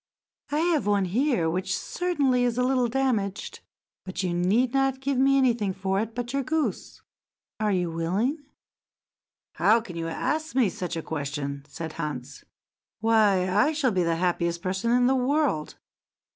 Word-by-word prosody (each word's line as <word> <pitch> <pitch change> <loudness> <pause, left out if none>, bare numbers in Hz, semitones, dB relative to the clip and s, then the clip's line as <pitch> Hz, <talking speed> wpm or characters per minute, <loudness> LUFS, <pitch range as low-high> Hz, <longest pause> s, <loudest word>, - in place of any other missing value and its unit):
I 295 +2 0
have 330 - +1
one 200 -2 +2
here 225 - +1
which 185 +3 -1
certainly 285 -9 0
is 240 -1 0
a 250 - +2
little 255 -1 +2
damaged, 225 -6 -1 0.4
but 185 0 -4
you 180 -2 -1
need 210 +9 +2
not 270 -1 +1
give 270 -1 -1
me 275 +1 +4
anything 235 -7 +2
for 195 0 -1
it 225 +1 -3
but 245 +1 -4
your 275 - +1
goose. 310 +3 -3 0.6
Are 215 -1 +1
you 180 -3 0
willing?" 190 - -1 1.2
"How 225 +2 +5
can 210 -7 -9
you 165 0 -3
ask 310 - -2
me 250 -6 +4
such 180 -2 -4
a 165 - -4
question?" 140 -2 -4
said 160 +2 -7
Hans. 140 -2 -6 0.6
"Why, 210 -4 +3
I 210 +12 +2
shall 285 -5 +1
be 185 -3 +1
the 170 -1 +1
happiest 170 0 -1
person 190 +4 -1
in 245 +1 +4
the 260 - +4
world. 265 - 0
215 Hz, 165 wpm, -26 LUFS, 180-265 Hz, 1.2 s, How